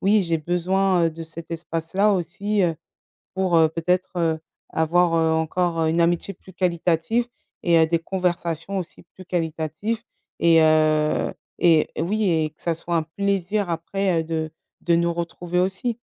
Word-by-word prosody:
oui, 205 +2 +4
j'ai 165 -2 0
besoin, 180 +2 +1
heu, 165 - +2
de 165 +1 -8
cet 165 +1 -9
espace-là 165 +5 0
aussi, 195 +4 -1
heu, 170 -2 +2 0.6
pour, 185 -2 +1
heu, 160 -1 +6
peut-être, 180 +3 0
heu, 165 -2 +1 0.3
avoir, 165 +2 +2
heu, 160 -1 +3
encore 165 +1 0
une 165 +2 +2
amitié 175 +3 0
plus 190 - -16
qualitative 180 +5 0 0.4
et 170 -1 +4
heu, 160 - +5
des 165 +1 +1
conversations 175 0 -2
aussi 175 -2 -7
plus 185 - -12
qualitatives 165 +5 -2 0.4
et 165 -1 +6
heu, 155 -1 +3 0.3
et 165 -3 +4
oui 210 +5 0
et 160 -2 +1
que 155 - -28
ça 170 - 0
soit 170 +1 -3
un 165 - +2
plaisir 200 +3 -1
après, 170 +1 0
heu, - - -4
de 160 -1 -3 0.3
de 170 - +2
nous 170 0 +1
retrouver 175 +1 -3
aussi». 190 +6 0
170 Hz, 165 wpm, -23 LUFS, 160-185 Hz, 0.6 s, heu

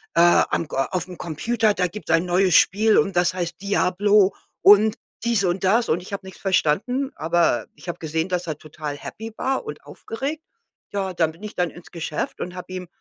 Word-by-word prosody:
äh: 170 - +5 0.3
„Am 165 - -1
aufm 175 +6 -2
Computer, 215 +7 0
da 180 -2 0
gibt's 210 +5 -6
ein 165 +2 +3
neues 180 0 +3
Spiel 215 +2 +5
und 195 -4 +2
das 175 0 +3
heißt, 175 0 -4
‚Diablo‘ 200 0 +3 0.3
und 210 +2 +6 0.3
dies 235 -4 +2
und 180 +2 -1
das“, 225 +5 +3
und 170 - +1
ich 185 - -10
habe 195 -1 -5
nichts 190 - -11
verstanden, 205 - +1
aber 165 -6 +1
ich 150 +4 -15
habe 175 - -4
gesehen, 160 +2 -2
dass 180 -1 -1
er 155 - -3
total 150 -1 -7
happy 220 +8 -8
war 270 - -1
und 440 - -8
aufgeregt, 285 +7 -5 0.5
ja, 195 -2 -2
dann 165 -2 +1
bin 165 +4 -19
ich 210 - -7
dann 180 -2 0
ins 175 - -14
Geschäft 170 -3 -4
und 180 - -4
habe 185 0 -8
ihm 180 -1 -6
185 Hz, 200 wpm, -23 LUFS, 170-210 Hz, 0.5 s, und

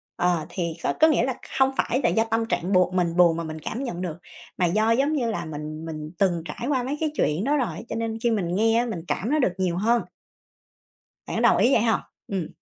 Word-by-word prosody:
ờ, 175 -3 +1
thì 170 -3 -3
có - - +1
có 315 - +7
nghĩa 295 -6 +3
là 260 -1 -1 0.2
không 265 0 +4
phải 255 +4 +1
là - - +4
do 225 - +2
tâm 225 0 0
trạng 190 -3 -1
buồn 185 0 +3
mình 170 -2 +1
buồn 170 -2 +5
mà 170 - -3
mình 155 0 -6
cảm 245 - -4
nhận 180 -8 -4
được, 170 -3 -4 0.4
mà 180 - +2
do, 215 +6 +2
giống 275 +6 +2
như 240 -6 0
là, 170 -6 -3
mình 155 +1 -6
mình 155 -1 -6
từng 175 -4 +2
trải 170 +10 -5
qua 260 -4 +1
mấy 275 +4 -3
cái 310 -2 0
chuyện 155 - +1
đó 290 +3 +2
rồi, 255 - -1
cho - - -3
nên 225 -1 -2
khi 235 - +3
mình 180 -5 -1
nghe 225 +2 +3
á 240 - +1
mình 225 -8 -4
cảm 215 - -2
nó 305 - +3
được 190 -9 +2
nhiều 180 -2 0
hơn. 230 +4 +2 1.2
Bạn - - -4
có - - 0
đồng - - +5
ý 250 - +4
vậy - - +4
hông? 225 -1 +2 0.3
Ừm. 190 -5 -2
210 Hz, 255 wpm, -25 LUFS, 170-240 Hz, 1.2 s, có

